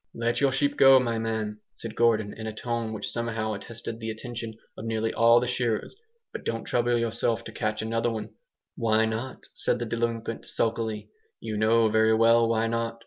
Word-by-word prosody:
"Let 115 +3 0
your 140 -1 +4
sheep 145 +2 0
go, 135 -1 +8
my 115 -3 -1
man," 110 -2 -2 0.2
said 115 -2 -6
Gordon, 110 -3 +2
in 110 0 -6
a - - -2
tone 115 -1 -2
which 110 - -4
somehow 115 -2 -2
arrested 115 +2 -7
the 115 0 -4
attention 115 0 -6 0.2
of - - -8
nearly 110 0 -1
all 115 +1 +6
the 125 - -1
shearers, 120 - -1 0.4
"but - - -6
don't 115 0 -2
trouble 120 0 +1
yourself 115 0 0
to - - -8
catch 110 -1 -2
another!" 115 -1 -1 0.5
"Why 110 -2 +2
not?" 115 +4 -4
said - - 0
the 120 - -3
delinquent, 115 0 -3
sulkily. 110 -2 -2 0.3
"You 110 - -5
know 110 +2 +4
very 110 +1 +4
well 115 +1 +5
why 115 0 +2
not!" 115 0 -2
115 Hz, 185 wpm, -27 LUFS, 110-115 Hz, 0.5 s, go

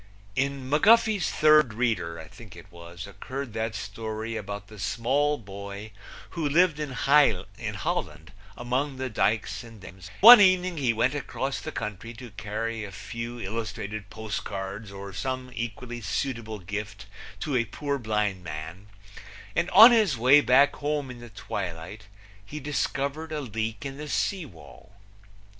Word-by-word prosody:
In 135 -1 -1
McGuffey's 205 - +4
Third 150 -7 +4
Reader, 100 -9 -1
I 80 - -9
think 110 -8 -14
it 85 +2 -14
was, 85 0 -10
occurred 120 +6 -7
that 110 0 -2
story 110 +1 -5
about 100 -1 -5
the 105 0 -13
small 140 +9 +1
boy 100 0 -8 0.4
who 160 -4 -2
lived 165 0 +3
in 150 -1 -3
Holland 105 - 0 0.3
among 130 +4 -1
the 130 -1 -4
dikes 110 +3 0
and 115 -2 -13
dams, 90 -2 -12
and 100 - -18
one 235 +1 +12
evening 185 -2 +4
he 130 -5 +2
went 115 +4 +1
across 140 -1 -3
the - - -5
country 110 +2 -6
to 120 0 -10
carry 110 +2 -4
a 100 - -7
few 115 +5 -6
illustrated 110 -1 -5
post 110 -1 -5
cards 100 +1 -6
or 100 0 -8
some 130 +5 -4
equally 120 +1 -5
suitable 115 -3 -3
gift 100 +1 -6 0.4
to 145 -4 -2
a 115 -2 +2
poor 140 +5 -3
blind 105 -5 -1
man, 85 +4 -7 0.7
and 170 +2 +1
on 230 +4 +10
his 215 - +3
way 130 +5 +6
back 140 +1 +4
home 145 -2 -2
in 125 - -10
the 120 0 -11
twilight 95 0 -6 0.4
he 150 +9 -7
discovered 145 +2 -2
a 155 - -2
leak 110 -3 -4
in 135 0 -5
the 150 0 -7
sea 185 0 -1
wall. 80 - -16
115 Hz, 155 wpm, -27 LUFS, 100-140 Hz, 0.7 s, one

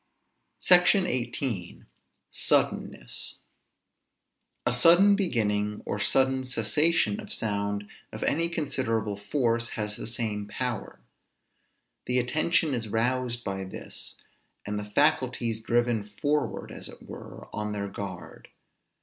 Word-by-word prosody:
SECTION 180 +2 +6
XVIII. 120 - -3 0.5
SUDDENNESS. - - 0 1.3
A 125 - +3
sudden 175 +11 +6
beginning, 105 - 0
or 105 - -2
sudden 130 +4 +2
cessation 150 - +2
of 210 -1 -7
sound 100 - -1 0.2
of - - -5
any 165 +3 +2
considerable 115 -10 -1
force, 115 +2 0
has 105 -1 -2
the - - -5
same 110 -3 -2
power. 120 +1 -4 1.1
The 125 - +1
attention 155 +4 +2
is 115 -3 -2
roused 120 +2 0
by 95 -1 -3
this; 95 - -8 0.5
and 105 0 -2
the 105 - -5
faculties 125 -3 +2
driven 120 -1 +1
forward, 145 +9 -1
as - - -6
it - - -13
were, - - -9
on 105 0 -2
their 100 -1 -2
guard. 95 -2 -7
120 Hz, 115 wpm, -28 LUFS, 105-140 Hz, 1.3 s, SECTION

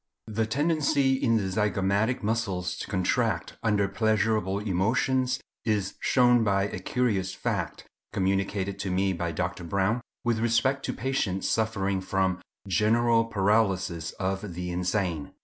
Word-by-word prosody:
The 110 0 -1
tendency 145 0 +2
in 130 -4 +2
the 105 - 0
zygomatic 105 +3 0
muscles 100 -5 -1
to - - -5
contract 95 0 0
under 105 -3 +2
pleasurable 110 -1 +1
emotions 115 +6 +1 0.2
is 105 -4 0
shown 125 -2 +4
by 100 -2 +2
a 100 -2 -3
curious 100 -3 -1
fact, - - -3 0.3
communicated 95 +1 -1
to 100 - -3
me 95 +1 +1
by 85 -1 -2
Dr. 90 +2 -3
Browne, 100 +6 0 0.2
with 120 -2 +1
respect 120 +4 +1
to - - -2
patients 115 -8 -1
suffering 100 -4 0
from 95 -1 0 0.3
GENERAL 115 +3 +3
PARALYSIS 95 -6 +1
OF 95 -1 -3
THE 90 0 -4
INSANE. 90 -3 -1
100 Hz, 130 wpm, -27 LUFS, 95-115 Hz, 0.3 s, shown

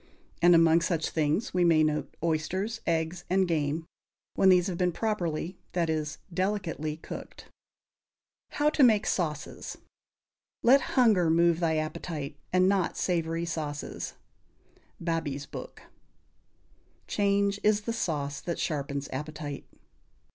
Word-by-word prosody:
And 175 0 +7
among 165 0 +5
such 165 -2 -1
things 155 +8 0
we 180 -1 +3
may 165 -2 +5
note 150 0 -1
oysters, 185 +8 -1
eggs 165 +1 0
and 190 0 +3
game, 155 -1 -1 0.5
when 190 - +4
these 180 -1 +5
have 185 -2 -2
been 180 -1 +2
properly 180 -4 -2
that 170 -2 +1
is, 155 -1 -2 0.2
delicately 170 -5 -2
cooked. - - -9 1.0
=How 295 +1 +2
to 305 - +1
Make 220 -5 +5
Sauces.= 155 -5 -3 0.9
Let 270 +4 +6 0.2
hunger 210 -9 +5
move 170 0 +4
thy 165 -2 +1
appetyte, 155 -1 -4 0.2
and 185 0 +4
not 190 -3 +1
savory 165 -1 0
sauces. 150 -3 -4 0.8
Babees 160 -4 -2
Book. - - -9 1.2
"Change 200 0 +1
is 210 0 +3
the 230 +2 -3
sauce 145 -9 -2
that 170 - -3
sharpens 140 -2 -2
appetite." 150 0 -5
170 Hz, 125 wpm, -28 LUFS, 155-190 Hz, 1.2 s, And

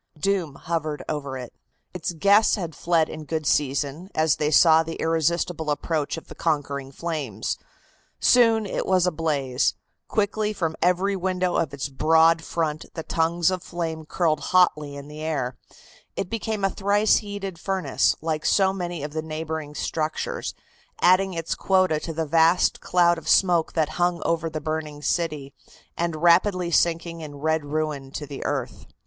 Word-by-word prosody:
Doom 185 -6 0
hovered 155 -2 -3
over 140 -3 -3
it. 125 -2 -8 0.4
Its 180 -1 -3
guests 200 +6 +4
had 175 -6 -5
fled 165 0 +1
in 155 - -7
good 155 0 -3
season, 145 +5 0
as 160 0 +2
they 150 - 0
saw 160 +1 +6
the 165 0 -5
irresistible 165 0 0
approach 150 +1 -1
of 165 - -10
the - - -10
conquering 140 -4 -2
flames. 140 - -4 0.6
Soon 230 -3 +4
it 195 - -3
was 185 -1 +3
ablaze; 150 -6 0 0.3
quickly 215 0 0
from 165 -5 -2
every 180 +3 +2
window 185 -1 -1
of 165 -4 0
its 140 0 -4
broad 160 +4 +4
front 160 -2 -2
the 160 - -4
tongues 165 +2 +1
of 185 -1 -2
flame 165 -3 -4
curled 160 -3 +1
hotly 150 -6 +2
in 140 0 -9
the 150 +1 -9
air; 140 -6 -2 0.6
it 185 - -4
became 220 -2 -3
a 195 - +1
thrice 205 +2 +3
heated 200 -4 -5
furnace, 185 -9 +1
like 155 -1 -2
so 190 -1 +3
many 175 -5 -4
of 150 0 -5
the 155 - -2
neighboring 155 -1 -5
structures, 165 - -3 0.4
adding 185 +1 +4
its 165 -1 -2
quota 185 -5 +2
to 165 - -5
the 160 0 -2
vast 165 +3 +3
cloud 175 -1 +3
of - - -7
smoke 175 -4 +3
that 155 -2 +1
hung 175 0 +2
over 165 -1 0
the 155 -1 -4
burning 155 -1 -4
city, 150 -6 -1 0.4
and 170 -2 -2
rapidly 175 +1 +4
sinking 165 0 +1
in 150 -2 -8
red 160 +1 -1
ruin 150 -2 -3
to 145 +2 -6
the 140 -1 -7
earth. 130 -4 -3
165 Hz, 165 wpm, -24 LUFS, 150-180 Hz, 0.6 s, saw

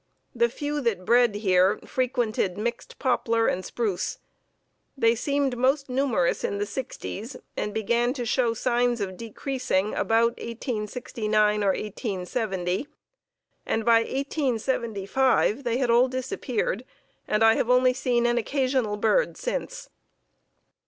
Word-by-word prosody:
The 235 -1 +2
few 290 +4 -3
that 215 -7 -1
bred 240 -1 +4
here 190 -1 +3
frequented 240 -7 -1
mixed 235 +2 -4
poplar 230 -3 +1
and 185 - 0
spruce. 210 -5 -2 0.8
They 230 -3 +4
seemed 280 +2 0
most 270 +3 +1
numerous 250 -9 +1
in 200 - -1
the 205 - -1
sixties 230 0 -6 0.2
and 210 - -2
began 235 +3 +1
to 250 -4 -4
show 235 -1 +1
signs 240 0 +1
of 190 -2 -3
decreasing 225 -2 -2
about 230 +1 +2
1869 215 -2 -1
or - - +1
1870, 195 0 -3 0.8
and 225 -1 -1
by 230 -1 +6
1875 255 -2 0
they 240 -1 0
had 255 -3 +1
all 240 +2 +5
disappeared 255 -3 -2 0.4
and 210 +1 +2
I 225 0 +7
have 230 - -1
only 250 0 +5
seen 245 -1 +1
an 240 0 +2
occasional 255 -3 0
bird 225 - +2
since." - - -4
235 Hz, 125 wpm, -26 LUFS, 210-255 Hz, 0.8 s, I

